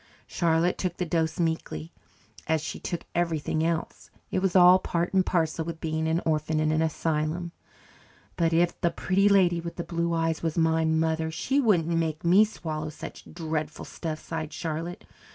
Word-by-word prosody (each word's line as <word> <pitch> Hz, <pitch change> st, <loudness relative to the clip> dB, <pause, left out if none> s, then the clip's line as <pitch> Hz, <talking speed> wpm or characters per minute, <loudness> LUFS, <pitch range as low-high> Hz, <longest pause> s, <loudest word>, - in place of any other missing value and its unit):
Charlotte 170 Hz, +1 st, +1 dB
took 180 Hz, -2 st, -2 dB
the 180 Hz, -, -1 dB
dose 160 Hz, 0 st, -1 dB
meekly, 160 Hz, -, -2 dB, 0.5 s
as 160 Hz, 0 st, +2 dB
she 150 Hz, -, -6 dB
took 175 Hz, -, -4 dB
everything 160 Hz, -2 st, 0 dB
else. 165 Hz, 0 st, -2 dB, 0.2 s
It -, -, +1 dB
was 190 Hz, -1 st, 0 dB
all 180 Hz, 0 st, +8 dB
part 175 Hz, -1 st, -2 dB
and 190 Hz, -1 st, +4 dB
parcel 165 Hz, -3 st, 0 dB
with 165 Hz, 0 st, -6 dB
being 160 Hz, 0 st, -1 dB
an 165 Hz, +2 st, +1 dB
orphan 155 Hz, 0 st, 0 dB
in 155 Hz, 0 st, +2 dB
an 155 Hz, 0 st, +2 dB
asylum. 160 Hz, +1 st, -1 dB, 0.8 s
"But 165 Hz, -1 st, +1 dB
if 170 Hz, +1 st, +1 dB
the 170 Hz, -, +3 dB
Pretty 195 Hz, +4 st, +2 dB
Lady 180 Hz, -4 st, +4 dB
with 170 Hz, 0 st, -6 dB
the 170 Hz, -, -4 dB
Blue 170 Hz, 0 st, -1 dB
Eyes 165 Hz, -1 st, 0 dB
was 165 Hz, -1 st, -2 dB
my 160 Hz, 0 st, +3 dB
mother, 160 Hz, 0 st, +1 dB
she 255 Hz, -, 0 dB
wouldn't 200 Hz, -, +3 dB
make 165 Hz, -2 st, -1 dB
me 185 Hz, +5 st, +7 dB
swallow 155 Hz, -7 st, -5 dB
such 155 Hz, -, -10 dB
dreadful 155 Hz, -2 st, -4 dB
stuff," 160 Hz, -2 st, -5 dB
sighed 160 Hz, -1 st, -5 dB
Charlotte. 165 Hz, +3 st, -5 dB
165 Hz, 175 wpm, -27 LUFS, 160-175 Hz, 0.8 s, all